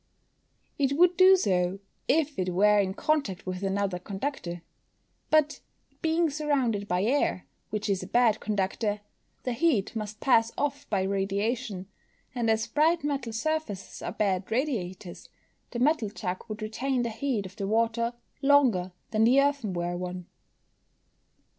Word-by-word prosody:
_ - - +1
It 270 0 +2
would 360 +1 +5
do 375 +2 +8
so, 185 - +1 0.3
if 300 -2 +1
it 185 0 0
were 210 +2 +5
in 190 -1 0
contact 280 - -1
with 185 0 -4
another 195 -2 -1
conductor; 190 - -5 0.7
but, 305 -1 +3 0.4
being 325 -1 +2
surrounded 270 -9 0
by 180 0 0
air, 240 -5 +1 0.2
which 210 0 -3
is 195 -2 0
a - - -7
bad 235 -3 +3
conductor, 205 +1 -1 0.4
the 250 - -1
heat 235 - +1
must 215 -1 -5
pass 230 -4 +3
off 285 0 -2
by 195 -3 +1
radiation, 200 +1 -1 0.5
and 240 -3 0
as 220 0 +2
bright 315 +6 +2
metal 275 -5 -2
surfaces 230 -4 -3
are - - -4
bad 190 -3 -1
radiators, 210 - -3 0.4
the 240 - -6
metal 255 -3 +2
jug 185 -3 -5
would 215 -1 -6
retain 250 +4 -1
the 235 - -2
heat 230 -3 -2
of 185 +1 -11
the 195 - -3
water 230 +2 +1 0.3
longer 255 -11 +3 0.2
than 215 0 +2
the 250 +4 +5
earthenware 195 -12 0
one. 180 0 -5
220 Hz, 145 wpm, -28 LUFS, 195-275 Hz, 0.7 s, do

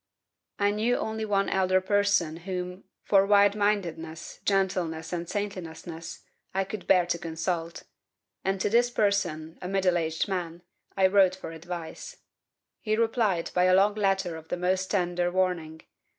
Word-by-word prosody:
"I 205 0 +2
knew 220 +4 +1
only 220 0 -3
one 200 -2 +1
elder 185 -1 +2
person 200 -4 +1
whom 180 +1 -5 0.2
(for 195 -1 +4
wide 205 0 +5
mindedness, 175 -6 -2
gentleness, 180 -5 0
and 170 -1 -3
saintliness) 170 -5 -6 0.3
I 195 - +2
could 200 +1 -7
bear 180 -2 +5
to 170 -1 -1
consult; 165 +1 -3 0.6
and 195 0 0
to - - +2
this 240 +1 +4
person, 180 -8 -1
a 180 - -4
middle 185 -2 +2
aged 160 +2 -1
man, 175 -3 -4 0.3
I 190 - +5
wrote 190 -1 +5
for 185 - -8
advice. 170 - -7 0.6
He 215 -1 0
replied 225 -6 +1
by 180 0 +3
a 185 0 +5
long 200 +2 +4
letter 195 -5 0
of 160 0 -12
the - - -3
most 185 +1 0
tender 175 -2 0
warning. 175 -4 -1
185 Hz, 150 wpm, -27 LUFS, 170-200 Hz, 0.6 s, wide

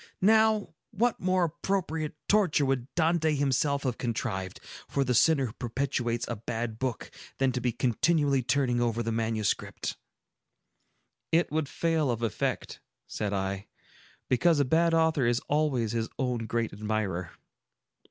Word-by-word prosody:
Now, 220 -1 +3 0.2
what 230 +2 0
more 185 0 +2
appropriate 160 -2 -2
torture 185 -9 +3
would 130 -2 0
Dante 160 -2 +2
himself 140 0 +1
have 125 -4 -2
contrived, 105 -6 -3 0.3
for 140 - 0
the 125 -1 0
sinner 135 +3 +4
who 110 - -6
perpetrates 120 -1 -2
a 120 - -3
bad 115 0 -4
book, 130 -3 -3 0.3
than 135 -1 +2
to 125 - -3
be 125 +1 +1
continually 140 +4 +2
turning 125 -1 +1
over 120 -1 0
the 115 - -2
manuscript?" 110 -2 -2 1.3
"It 165 -1 +2
would 155 -2 -1
fail 160 -4 0
of 120 -1 -1
effect," 110 -5 -2 0.2
said 105 -2 -3
I, 95 0 -2 0.6
"because 160 +5 +3
a 140 - +3
bad 165 +5 +3
author 160 -6 +3
is 120 0 +2
always 140 -7 0
his 115 -1 -2
own 125 -4 -1
great 115 -1 -1
admirer." 100 -4 -2
130 Hz, 145 wpm, -28 LUFS, 115-160 Hz, 1.3 s, sinner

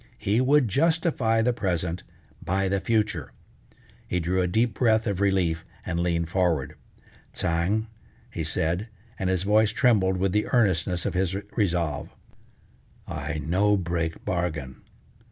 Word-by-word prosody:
He 105 +5 +1
would 140 0 +4
justify 140 - +2
the 125 +1 +2
present 90 -5 -2 0.4
by 95 +3 0
the 100 +1 +1
future. 105 +1 -1 0.7
He 90 - 0
drew 90 +2 0
a 90 - +1
deep 110 +4 +1
breath 110 0 +2
of 100 -3 -1
relief 90 -5 +1 0.2
and 85 - -2
leaned 85 -1 0
forward: 85 -6 0 0.6
"Tsang," 85 +6 0 0.5
he - - -3
said, 85 +7 -1 0.3
and 95 - 0
his 95 -1 0
voice 105 +1 +4
trembled 110 -6 +3
with 95 +1 +1
the 105 +2 +1
earnestness 90 -7 +1
of - - -1
his 95 0 0 0.2
resolve, 85 - 0 1.0
"I 75 - -4
no 100 +5 +3
break 85 -2 -3
bargain. 80 -7 -3
95 Hz, 135 wpm, -26 LUFS, 85-110 Hz, 1.0 s, would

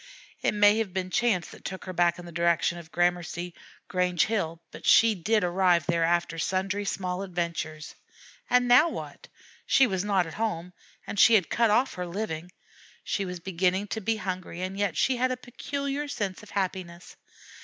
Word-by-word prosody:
It - - +1
may 205 +1 +5
have 200 -5 -3
been 185 -1 -2
chance 200 -8 +1
that - - -14
took 190 0 -6
her 185 - -5
back 175 0 +2
in 175 - -9
the 170 - -9
direction 170 0 +1
of 160 -1 -13
Gramercy 175 0 -1 0.3
Grange 180 -2 +1
Hill, 170 -7 -2
but - - -11
she 225 -1 +6
did 210 +3 +1
arrive 175 -2 +3
there 170 0 +1
after 170 0 0
sundry 190 +4 -1
small 185 -2 -2
adventures. 170 -4 -4 0.6
And 250 0 +4
now 250 +7 +6
what? - - -8 0.4
She 270 - +5
was 190 -6 -1
not 195 -3 +2
at 165 - -8
home, 180 -6 -3 0.3
and 205 - -4
she 230 - +7
had 190 -7 +2
cut 230 -1 +3
off 245 +6 +2
her 180 -1 -5
living. 175 -2 -4 0.5
She 200 - -2
was 180 -1 -6
beginning 185 +2 0
to 220 - -3
be 225 +3 0
hungry, 185 -3 -5
and 185 +1 -4
yet 200 -4 -1
she 260 -2 +2
had 255 +1 +1
a 255 - -2
peculiar 280 +3 -4
sense 200 -9 -3
of 210 - -14
happiness. 185 -3 -4
185 Hz, 185 wpm, -27 LUFS, 175-215 Hz, 0.6 s, she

